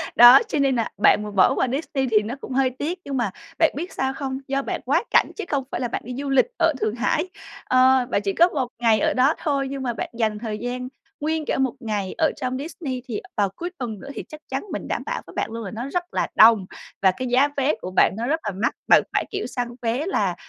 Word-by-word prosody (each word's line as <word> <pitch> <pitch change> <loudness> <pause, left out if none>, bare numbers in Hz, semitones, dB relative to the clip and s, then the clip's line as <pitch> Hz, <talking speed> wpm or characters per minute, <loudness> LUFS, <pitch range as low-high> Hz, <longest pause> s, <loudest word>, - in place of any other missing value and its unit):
Đó, 240 +1 +10
cho 305 - -1
nên 275 -2 +2
nà 230 -2 0
bạn 210 0 +3
bỏ 190 +7 +5
qua 265 - +1
Disney 270 0 -2
thì 215 - +5
nó 225 +5 -5
cũng - - -6
hơi 265 0 +3
tiếc, 340 +6 -2
nhưng 275 -2 -3
mà 220 -6 0 0.3
bạn 325 -1 +5
biết 345 +6 -5
sao 265 0 -1
không? 270 -2 -4
Do 275 +1 0
bạn - - -4
quá - - +2
cảnh - - +4
chứ 425 - -4
không 280 -2 0
phải - - -3
là 245 - 0
bạn - - -4
đi 250 - -6
du 280 +1 -4
lịch 270 - +4
ở 325 -2 +4
Thượng 215 +1 0
Hải, 310 +9 0 0.4
ờ, 255 0 +4
bạn 200 - +1
chỉ 200 -1 -1
có 345 - +5
1 265 -7 -2
ngày 225 -3 +3
ở - - +1
đó 260 +4 +4
thôi, 275 -3 -1
nhưng 270 -1 -5
mà 240 -2 -1
bạn - - -4
dành 215 -2 0
thời 215 -2 -4
gian 250 +2 -4 0.3
nguyên 315 +1 -1
cả - - -1
một 265 -3 +1
ngày 205 -4 -3
ở 320 -2 +3
trong 255 -2 -3
Disney, 275 -3 -5
thì 225 -4 -4 0.2
vào 200 -2 +2
cuối 350 - -4
tuần 230 -7 -5
nữa, 275 - -10
thì - - -6
chắc 305 0 -10
chắn 270 +1 -2
mình - - -5
đảm - - -2
bảo - - -3
với - - -12
bạn - - -2
luôn 230 0 -5
là 195 - -6
nó 240 +5 -5
rất 355 +3 -1
là - - 0
đông, 220 -3 +7 0.4
và 190 -1 +5
cái 255 - -3
giá 255 +4 +4
vé 275 +2 +2
của 185 - -5
bạn - - +5
nó 235 - -2
rất 320 +4 +1
là - - 0
mắc. 235 - +1
Bạn - - +6
phải, - - +1
kiểu, 400 0 -3
săn 245 -1 -3
vé 240 +7 -1
là, 390 - 0
255 Hz, 265 wpm, -23 LUFS, 230-280 Hz, 0.4 s, Đó